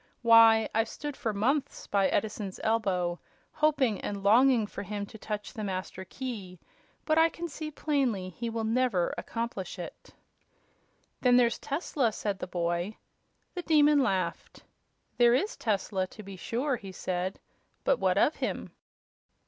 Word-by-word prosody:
Why, 230 -1 +7
I've 225 0 +1
stood 295 -1 -6
for 225 - -2
months 255 +8 -1
by 195 -1 +2
Edison's 205 -2 -2
elbow, 185 -6 0 0.3
hoping 285 -9 +1
and 200 -1 -4
longing 235 +2 +5
for 200 - -7
him 205 0 -4
to 220 - -13
touch 210 -1 -5
the 220 -4 -5
Master 190 -1 -4
Key; 200 -5 -6 0.5
but 310 0 +3
I 325 +1 +6
can 345 +1 -6
see 310 0 -6
plainly 265 -11 -1
he 230 +6 -5
will 225 0 -3
never 225 -5 +1
accomplish 230 -5 -4
it." - - -9 1.1
"Then 250 -1 +5
there's 235 -2 +3
Tesla," 280 -5 -1
said 200 -2 -3
the - - -4
boy. 175 +3 -2 0.6
The 360 - -4
Demon 300 -3 +5
laughed. 190 -8 -2 0.6
"There 240 0 +6
is 400 +12 0
Tesla, 195 -3 -1
to 215 - -12
be 195 0 -9
sure," 245 +8 -1
he 195 -3 -9
said. 185 +1 -3 0.4
"But - - +2
what - - +2
of - - +3
him?" - - -3
220 Hz, 150 wpm, -29 LUFS, 195-260 Hz, 1.1 s, Why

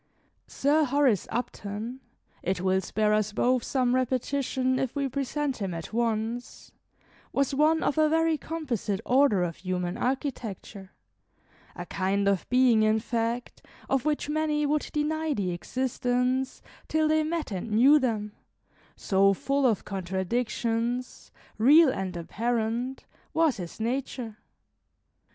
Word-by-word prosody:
Sir 295 +3 +2
Horace 270 -7 +2
Upton 225 0 -4 0.4
it 190 0 -1
will 190 +1 +1
spare 210 +3 +1
us 215 0 +1
both 250 +2 +2
some 250 -2 +1
repetition 255 0 0
if 260 - -2
we 280 -1 0
present 275 +1 -2
him 195 -5 -3
at 165 +5 -7
once 230 +1 -2 0.6
was 275 0 0
one 310 +3 +3
of 315 - +1
a 310 0 +4
very 325 0 +2
composite 270 - -3
order 250 -8 +4
of 170 -2 -3
human 180 0 -3
architecture; 225 -7 -4 0.8
a - - -6
kind 200 +1 0
of 195 -2 0
being, 250 -3 +4
in 215 0 +3
fact, 230 +1 -3 0.3
of 270 -2 +2
which 300 -1 -1
many 300 0 0
would 295 +1 0
deny 310 0 -1
the 190 -5 -1
existence, 250 +5 -1 0.2
till 315 0 +2
they 310 0 +3
met 315 -3 -2
and 195 +3 -4
knew 260 +8 +6
them, 220 -5 -1 0.6
so 195 0 +3
full 275 +5 +1
of 220 -5 0
contradictions, 230 +6 -2 0.3
real 295 +7 +7
and 190 -7 -3
apparent, 235 +7 -2 0.3
was 320 -4 +3
his 175 0 -7
nature. 235 -1 -3
245 Hz, 130 wpm, -27 LUFS, 210-280 Hz, 0.8 s, real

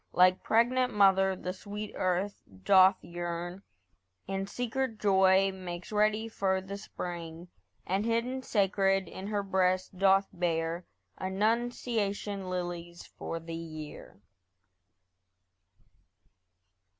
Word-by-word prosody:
Like 185 0 +5
pregnant 250 +2 +2
mother 195 -1 +5
the 180 0 -4
sweet 205 +2 -7
earth 185 +2 -1 0.2
doth 190 - +6
yearn; 175 +1 -5 0.7
In 195 0 -2
secret 245 +1 -2
joy 190 -1 +4
makes 180 -1 -7
ready 215 +1 +2
for 190 -4 0
the 190 +1 -7
spring; 170 -3 -7 0.4
And 190 +3 0
hidden, 230 +3 0
sacred, 195 -4 +1
in 190 +3 -7
her 205 -1 -1
breast 185 -1 +1
doth 195 0 +4
bear 170 0 -1 0.3
Annunciation 205 -1 -1
lilies 175 -1 -5
for 165 - -6
the 165 0 -8
year. 155 -9 -8
190 Hz, 100 wpm, -30 LUFS, 180-205 Hz, 0.7 s, doth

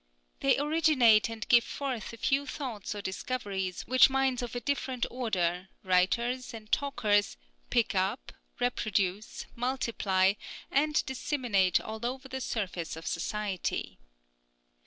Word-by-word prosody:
They 135 - +3
originate 285 -8 +4
and 225 -1 -6
give 235 -1 +6
forth 260 -7 -4
a 230 - -10
few 275 +4 +1
thoughts 235 -8 -5
or 205 - -6
discoveries, 190 -3 -3
which 255 +2 +6
minds 265 -2 +1
of 245 0 -5
a - - -1
different 260 -2 -1
order, 190 -7 -1
writers 235 +8 +1
and 215 -1 -11
talkers, 210 -8 +1 0.3
pick - - +2
up, - - -1 0.3
reproduce, 195 - -1
multiply, 230 -7 +1 0.4
and 300 +2 +2
disseminate 240 - +1
all 220 +1 -7
over 260 +3 -3
the 265 0 -5
surface 185 -9 -3
of 160 - -9
society. 210 - -3
230 Hz, 125 wpm, -30 LUFS, 195-260 Hz, 0.4 s, give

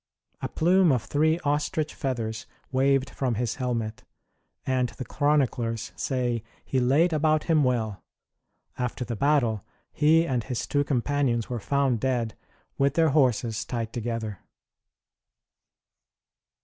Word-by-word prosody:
A - - -3
plume 180 +1 +4
of 125 -6 +1
three 155 - +2
ostrich 150 +1 0
feathers 115 -4 -3 0.2
waved 135 +1 +2
from 125 -4 -1
his 115 0 -2
helmet, 115 -4 -2 0.6
and 130 -2 +1
the 130 - -7
chroniclers 125 -6 0
say 125 -3 -1 0.2
he 130 - 0
laid 145 +8 +3
about 155 0 +2
him 160 -3 +3
well. 115 -5 -1 0.8
After 125 0 -2
the 120 - -4
battle, 120 -5 +2 0.3
he 160 +3 +4
and 125 -6 -1
his 125 -1 -3
two 145 0 +1
companions 130 -3 0
were 120 - -2
found 135 +1 +1
dead, 120 -3 0 0.5
with 140 0 +2
their 165 -1 +4
horses 125 -6 +2
tied 115 -2 -4
together. 115 -4 -3
130 Hz, 125 wpm, -26 LUFS, 115-145 Hz, 0.8 s, plume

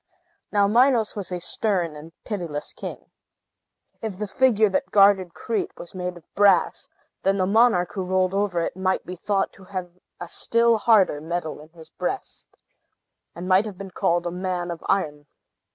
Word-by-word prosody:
Now, 205 -1 +3
Minos 235 0 +3
was 200 -3 -4
a 180 - -2
stern 175 -4 0
and 155 +2 -11
pitiless 170 -8 -4
king. - - -8 0.9
If 215 -4 -4
the 210 +1 -3
figure 220 -1 +3
that 190 -1 -1
guarded 195 -3 +4
Crete 225 -2 -3
was 170 - -10
made 180 -1 -4
of 170 - -15
brass, 200 -3 +3 0.3
then 195 +1 +2
the 185 - +2
monarch, 200 -3 +3
who 195 - -3
ruled 185 0 +1
over 195 -3 0
it, 165 - -3
might 190 0 -1
be 180 - -6
thought 195 +2 -1
to 190 - -16
have 185 -2 -5 0.3
a 175 - -6
still 230 +4 +2
harder 205 -9 +4
metal 160 -1 -4
in 155 - -15
his 160 -1 -15
breast, - - -5 0.9
and 175 +2 -6
might 190 +3 +4
have 200 -4 -8
been 195 0 -8
called 175 0 0
a 175 - -2
man 180 -1 -3
of 170 - -7
iron. 150 -6 -1
185 Hz, 175 wpm, -24 LUFS, 175-205 Hz, 0.9 s, guarded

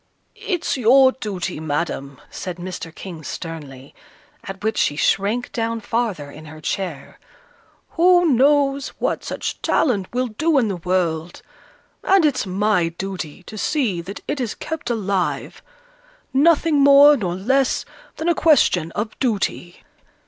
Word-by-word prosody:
"It's 350 -7 -2
your 260 +2 +6
duty, 190 - -5
Madam," 145 -3 -3
said 180 -1 -6
Mr. 175 -2 -6
King, 170 -5 -9
sternly, 145 -5 -8 0.5
at 195 0 -8
which 220 0 0
she 145 - +1
shrank 205 +9 0
down 230 0 -2
farther 210 -10 -2
in 155 +2 -12
her 155 0 -11
chair. 160 -3 -5 0.7
"Who 355 +1 +4
knows 275 +1 +3
what - - -1
such - - -4
talent 205 -10 +1
will 250 +1 0
do 305 +8 +1
in 235 -5 +2
the 190 - -3
world? 175 -2 -2 0.6
and 380 -4 +4
it's 270 -8 0
my 190 -2 +1
duty 180 -1 -6
to 215 +3 -9
see 235 - 0
that 195 +5 -8
it 290 - -2
is 235 -3 -3
kept 320 -4 -5
alive, 200 -5 -2 0.7
nothing 305 +1 +4
more 280 +1 +8
nor 185 -9 -2
less 265 +8 +1 0.3
than 320 - -4
a 345 - +4
question 185 - +3
of 215 +1 -4
duty." 205 -7 -2
210 Hz, 140 wpm, -21 LUFS, 175-275 Hz, 0.7 s, more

